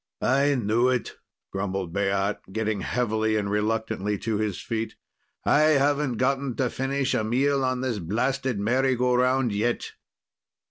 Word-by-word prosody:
"I 140 +3 +3
knew 120 +1 +2
it!" 125 -3 -1 0.4
grumbled 95 -3 -3
Baat, 100 0 -1
getting 110 0 -1
heavily 110 -1 0
and 105 -1 -1
reluctantly 105 -1 -1
to 110 +1 -2
his 105 -3 -2
feet. 115 0 -3 0.5
"I 155 0 +5
haven't 140 -1 +1
gotten 135 0 0
to 125 -3 0
finish 135 0 -1
a - - +1
meal 135 +5 +1
on 130 -1 0
this 125 -5 -1
blasted 125 +7 -1
merry 130 +5 +2
go 125 +1 +1
round 125 0 +2
yet." 120 +4 -1
120 Hz, 145 wpm, -25 LUFS, 105-130 Hz, 0.5 s, I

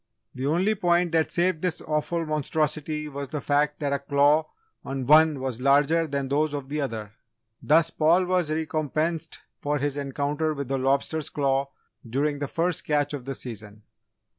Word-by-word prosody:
The 130 +2 -3
only 180 +8 +2
point 175 -4 +2
that 160 -1 +2
saved 175 -2 0
this 180 -3 -1
awful 160 +2 -2
monstrosity 155 0 -1
was 140 -2 -6
the 150 - -3
fact 145 +1 +1
that 145 -2 -1
a 140 - 0
claw 145 +3 +3 0.3
on 135 -1 -4
one 155 +1 +6
was 130 -2 -4
larger 145 +4 +3
than 140 -2 -2
those 150 +2 0
of 140 -2 -6
the 150 +1 -2
other! 110 -6 -4 0.5
Thus, 165 +2 +3
Paul 170 +4 +3
was 180 -3 +1
recompensed 155 +1 -2 0.2
for 145 +1 0
his 145 0 -2
encounter 145 +3 -1
with 140 -2 -5
a 135 - +1
lobster's 140 +4 0
claw 140 -1 0 0.4
during 145 +4 0
the 145 - -2
first 170 +4 -1
"catch" 145 -1 0
of 135 -4 -5
the 135 0 -4
season. 110 -3 -8
150 Hz, 170 wpm, -26 LUFS, 140-160 Hz, 0.5 s, one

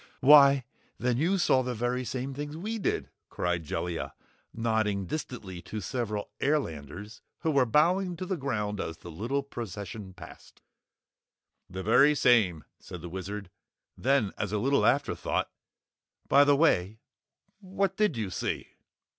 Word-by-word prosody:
"Why, 140 -1 +7 0.3
then 120 0 0
you 175 +8 +2
saw 135 -7 +3
the 125 -1 -3
very 120 +3 -1
same 130 +2 -4
things 145 +2 -6
we 220 +6 -4
did," - - -2 0.2
cried 90 -1 -1
Jellia, 85 +2 -4 0.4
nodding 110 -4 0
distantly 100 - -6
to 110 - -6
several 105 0 -3
airlanders 105 - -2 0.2
who 160 - +1
were 135 -4 +3
bowing 175 - +2
to 185 - -4
the 190 - -1
ground 105 - -2
as 80 - -5
the 85 +1 -10
little 120 - -2
procession 105 -6 -7
passed. - - -14 1.1
"The 95 +1 -6
very 135 +8 +5
same," 105 - +3 0.2
said 90 - -9
the 85 - -6
Wizard. 95 +1 -6 0.4
Then, 130 -5 +1
as 100 - -2
a 105 - 0
little 135 +6 +2
afterthought - - 0 0.8
"By 140 +1 +6
the 145 0 +5
way, 110 - +2 0.6
what 195 -1 -1
did 210 - +1
you 105 -4 -3
see?" - - -3
120 Hz, 145 wpm, -29 LUFS, 100-140 Hz, 1.1 s, Why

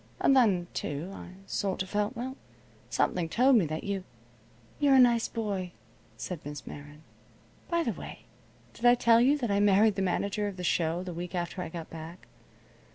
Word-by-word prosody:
And 275 - +4
then, 200 -9 +4
too, 150 +6 -4
I 180 - -10
sort 195 -1 -2
of 185 - -12
felt 210 +4 -1
well, 260 +3 -4 0.5
something 165 +7 0
told 255 +6 +4
me 185 -7 +2
that 155 +1 -4
you 200 -2 -3 0.4
" 115 +1 -29
"You're 285 -2 +5
a - - +7
nice 240 -2 +5
boy," 200 -6 -3 0.4
said 180 -4 -5
Miss 145 0 -7
Meron. 145 +1 -10 0.7
"By 340 -1 +1
the - - -1
way, - - -9 0.5
did - - -15
I 240 0 +7
tell 235 -1 +5
you 275 +4 +4
that 240 -7 -2
I 200 - +2
married 205 +1 +5
the 195 - -3
manager 200 +2 -1
of 200 -2 -6
the 180 - -6
show 170 0 0
the 180 -1 -6
week 175 +2 -6
after 175 +1 -3
I 175 - -5
got 165 -1 -8
back? 165 +2 -9
190 Hz, 195 wpm, -29 LUFS, 170-230 Hz, 0.7 s, a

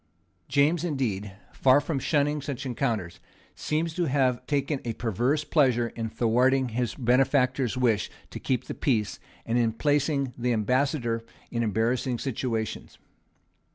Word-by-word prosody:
James 150 +4 +2
indeed, 115 - -2 0.2
far 130 +1 +5
from 145 -1 -2
shunning 145 +1 +1
such 140 -1 -5
encounters, 115 -9 -2 0.3
seems 155 +2 -2
to 175 +1 0
have 130 -4 +1
taken 140 -1 0
a 115 - -3
perverse 120 +7 0
pleasure 125 -7 +2
in 115 -1 -4
thwarting 125 +4 +2
his 120 0 -2
benefactor's 130 0 +2
wish 115 -5 +1 0.2
to - - -6
keep 130 -2 -1
the - - -6
peace, 110 -8 0 0.3
and 115 +1 +1
in 115 -1 +2
placing 140 +1 0
the 125 0 0
Ambassador 120 +1 0 0.3
in 115 - -1
embarrassing 115 +4 0
situations. 115 -4 -3
125 Hz, 135 wpm, -27 LUFS, 115-140 Hz, 0.3 s, far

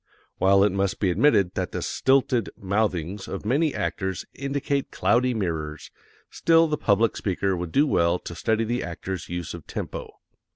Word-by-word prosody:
While 95 +1 +5
it 105 - +3
must 100 0 -1
be 95 -3 +2
admitted 100 -4 +3
that - - -3
the - - -3
stilted 130 -4 +2
mouthings 95 -2 -1
of - - -6
many 145 +7 +2
actors 95 -2 -2
indicate 140 0 -2
cloudy 125 +1 +2
mirrors, 80 -7 -3 0.4
still 165 0 +4
the 155 - 0
public 110 -4 +2
speaker 95 0 -1
would 85 -2 -4
do 145 - +4
well 85 - +2
to 85 - -8
study 110 +5 0
the 120 +2 -1
actor's 85 +1 -5
use 85 -2 -4
of 85 -3 -10
tempo. - - -5
100 Hz, 165 wpm, -25 LUFS, 90-125 Hz, 0.4 s, While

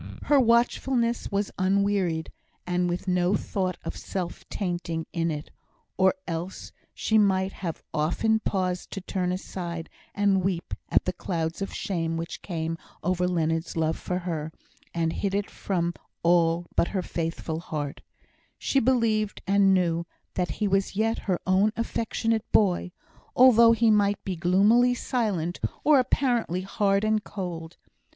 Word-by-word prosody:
Her 290 -1 +4
watchfulness 235 0 +2
was 200 0 -1
unwearied, 190 -4 +1 0.3
and 180 0 0
with 175 +2 -3
no 180 +1 +2
thought 185 -2 -2
of - - -5
self 180 -3 -5
tainting 175 -4 -3
in 170 -1 0
it, 150 -1 -5 0.4
or 190 +5 +4
else 170 +2 -5 0.2
she 220 0 +2
might 190 -2 +2
have 170 -5 -6
often 200 +9 +1
paused 185 -4 -2
to 195 - -4
turn 180 -1 -2
aside 170 -3 -5 0.2
and 200 -2 +2
weep 180 -2 -2 0.2
at - - +3
the 185 - -1
clouds 165 -1 -3
of 195 - -3
shame 165 -4 -2
which 165 +1 -5
came 165 -2 -3 0.2
over 180 0 +1
Leonard's 165 -1 -1
love 160 0 +1
for 180 - -3
her, 165 -4 -3 0.4
and 165 -1 0
hid 200 -1 -1
it 205 0 -2
from 175 -3 -1 0.3
all 170 0 +3
but - - +3
her 190 -3 -2
faithful 165 -1 -3
heart; 150 -4 -5 0.6
she 275 - +1
believed 225 -4 +1
and 195 0 +4
knew 170 -2 +1 0.3
that 180 -1 -1
he 210 - -1
was 195 0 +1
yet 225 +2 +1
her 180 - +2
own 190 +3 +3
affectionate 225 -1 -1
boy, 180 -3 +2 0.4
although 235 -2 +7
he 230 -1 +4
might 205 -1 +2
be 190 - -3
gloomily 205 +8 +4
silent, 200 -10 -1 0.2
or 295 -2 +6
apparently 240 -8 +1
hard 195 +1 +1
and 215 -1 +1
cold. 175 -4 -6
185 Hz, 145 wpm, -26 LUFS, 170-210 Hz, 0.6 s, although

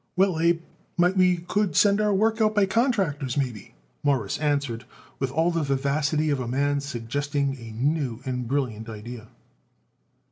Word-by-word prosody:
"Well, 185 -3 +2
Abe, 170 0 +2 0.3
might 180 +2 +3
we 180 -1 +4
could 180 0 -1
send 205 0 +4
our 210 0 +2
work 220 +3 +2
out 215 0 +3
by 205 -2 +5
contractors, 190 - 0
maybe," 125 -7 -3 0.3
Morris 135 -9 0
answered 145 -6 -1 0.3
with 135 - 0
all 160 +6 +1
the 165 -1 0
vivacity 145 +2 +1
of 140 - 0
a 125 - -3
man 140 +3 +1
suggesting 140 +2 -2
a 115 -1 -9
new 140 -4 0
and 125 -2 -3
brilliant 120 -4 -2
idea. 115 +1 -8
145 Hz, 155 wpm, -25 LUFS, 130-175 Hz, 0.3 s, by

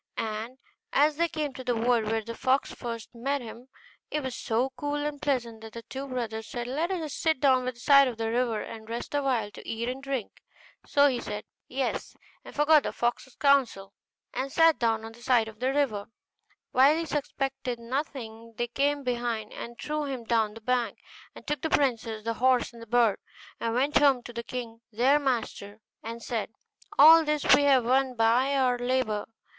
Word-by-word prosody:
And 225 +3 -4 0.4
as 295 +1 +3
they 340 +1 +2
came 305 -4 -3
to 260 - -8
the 245 -1 0
wood 230 0 +2
where 220 +1 -1
the 230 +2 -6
fox 260 +3 +1
first 230 -2 -7
met 270 +4 -1
them, 240 0 -10 0.4
it 300 -1 -2
was 260 -2 -4
so 240 +4 -1
cool 290 +3 -3
and 295 -1 -3
pleasant 235 -6 -1
that 220 -1 -10
the 230 - -8
two 270 +3 -6
brothers 225 -4 -4
said, 240 -1 -5
'Let 295 +8 -1
us 325 -6 -3
sit 320 -4 0
down 260 -2 +3
by - - 0
the 240 - -19
side 275 +2 +6
of 240 -3 -4
the 225 0 -2
river, 235 -3 0
and 220 0 -9
rest 235 +4 -5
a 290 - +1
while, 240 -7 0
to - - -12
eat 230 +1 -3
and 255 +2 -4
drink.' 275 -6 -4 0.5
So 285 0 +5
he 250 -4 0
said, 210 0 -5 0.2
'Yes,' 265 +1 -3 0.3
and - - -12
forgot 300 +1 +5
the - - -3
fox's 240 +2 -2
counsel, 255 -9 +2 0.4
and 270 +1 -3
sat 325 +1 +4
down 225 -2 +1
on 225 - -8
the 235 +1 -16
side 240 -3 +3
of 220 -1 -11
the 255 +2 +1
river; 270 -8 +1
and - - -37 0.6
while 275 +5 +5
he 330 - -2
suspected 270 -4 -3
nothing, 230 -3 -5
they 240 0 -1
came 285 +3 0
behind, 240 -3 -2
and 235 0 -8
threw 300 +2 -3
him 265 -4 -4
down 225 -2 +1
the 225 - -10
bank, 245 0 0 0.4
and - - -12
took 295 -2 -2
the 320 - -1
princess, 230 -7 0
the 230 +1 -1
horse, 250 0 +2
and 235 - -12
the 230 - -10
bird, 230 -3 +3 0.4
and 230 0 -1
went 275 +4 +3
home 275 -4 +4
to 240 - -9
the 235 - -4
king 235 -1 -7
their 255 +7 +3
master, 230 -6 -3 0.2
and 230 +1 -7
said. 225 -3 -3 0.5
'All 320 +3 +9
this 300 -1 0
have - - +6 0.3
we - - -5
won 260 -1 +2
by 240 +5 +3
our 250 -2 +2
labour. 245 -4 0
250 Hz, 205 wpm, -28 LUFS, 230-275 Hz, 0.6 s, All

